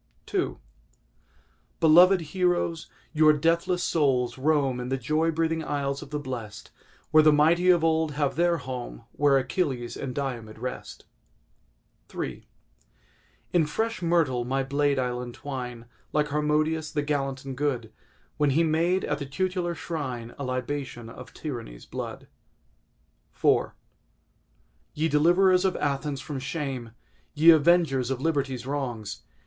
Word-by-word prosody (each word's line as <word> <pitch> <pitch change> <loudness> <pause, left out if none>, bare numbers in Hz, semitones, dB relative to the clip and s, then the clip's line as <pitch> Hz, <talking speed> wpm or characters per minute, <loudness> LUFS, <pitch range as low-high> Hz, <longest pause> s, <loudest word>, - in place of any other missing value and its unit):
II - - 0 1.2
Beloved 175 +4 +6
heroes! 175 0 -1 0.2
your 155 -1 +6
deathless 170 +4 +1
souls 130 -6 +1
roam 135 -2 +1
In 125 0 -4
the 135 - 0
joy 155 +4 0
breathing 165 0 0
isles 140 -2 -2
of - - -10
the 150 - -3
blest; 120 -7 -7 0.4
Where 155 - +7
the 155 0 +6
mighty 165 +5 +4
of 175 -3 +5
old 160 -1 +2
have 145 -1 0
their 170 0 +2
home 125 - -7
Where 145 -1 +3
Achilles 130 -3 -2
and 130 -2 -5
Diomed 120 -6 -4
rest 125 0 -7 1.1
III - - -5 1.1
In 165 -4 +3
fresh 225 +8 -2
myrtle 165 -8 +2
my 135 +2 -1
blade 140 +1 +1
I'll 125 -1 -1
entwine, 125 -1 -6 0.3
Like 150 -1 +1
Harmodius, 150 +1 0
the 150 - -1
gallant 135 -2 -2
and 135 -1 -5
good, 125 -5 -2 0.4
When 150 -1 +2
he 155 +5 +3
made 165 +4 +1
at 150 0 -2
the 140 - -5
tutelar 180 +3 -2
shrine 130 -9 -5
A - - -3
libation 130 -2 -4
of - - -11
Tyranny's 120 - -7
blood. - - -6 1.1
IV - - +2 1.3
Ye 155 +2 +1
deliverers 180 +5 +4
of 190 -1 +1
Athens 140 0 -2
from 145 -3 -5
shame! 130 -5 -4 0.4
Ye 160 +3 +8
avengers 155 -5 +3
of 135 -2 -2
Liberty's 135 -5 -1
wrongs! 125 -7 -4
145 Hz, 135 wpm, -26 LUFS, 130-160 Hz, 1.3 s, Ye